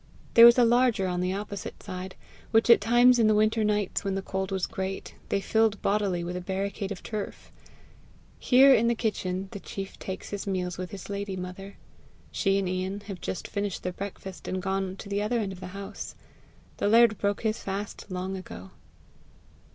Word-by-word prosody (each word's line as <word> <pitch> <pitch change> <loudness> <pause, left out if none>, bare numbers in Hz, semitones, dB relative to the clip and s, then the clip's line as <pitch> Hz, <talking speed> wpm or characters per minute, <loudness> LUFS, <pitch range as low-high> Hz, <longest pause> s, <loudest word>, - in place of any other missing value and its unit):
There 230 0 +11
was 235 - +7
a 245 - +6
larger 240 -4 +3
on 180 -1 -1
the 180 +1 0
opposite 200 -1 -6
side, 185 0 -6 0.3
which 225 +1 +4
at 235 - +7
times 240 +3 +5
in 225 - +5
the 215 - +4
winter 215 +1 +3
nights 210 -2 0
when 195 -1 -1
the 195 - -3
cold 190 0 -3
was 190 -2 0
great, 190 -3 -5 0.2
they 200 - +1
filled 220 +1 +2
bodily 195 -4 +1
with 175 +1 -4
a 180 - -3
barricade 195 +2 -3
of 195 - -6
turf. 210 -2 -6 0.9
Here, 270 +2 +7
in 235 -2 +3
the 235 - +2
kitchen, 195 -4 -2
the 200 - -6
chief 195 0 -7
takes 190 - -6
his 205 0 -4
meals 180 -2 -2
with 185 -1 -4
his 195 -2 -8
lady 200 -1 -4
mother. 185 +2 -7 0.5
She 195 -2 +1
and 195 -1 0
Ian 185 +2 -2
have 195 -4 -8
just 185 - -4
finished 200 -2 -3
their 180 - -2
breakfast, 190 -1 -7
and 185 - -2
gone 190 0 -2
to 200 - -10
the 200 0 -1
other 220 +3 0
end 205 -4 -1
of 185 - -9
the - - -7
house. 195 +1 -7 0.6
The - - 0
laird 225 0 +5
broke 200 0 0
his 220 0 -1
fast 200 +1 -5
long 185 +1 -3
ago. 95 - -9
200 Hz, 195 wpm, -27 LUFS, 190-215 Hz, 0.9 s, There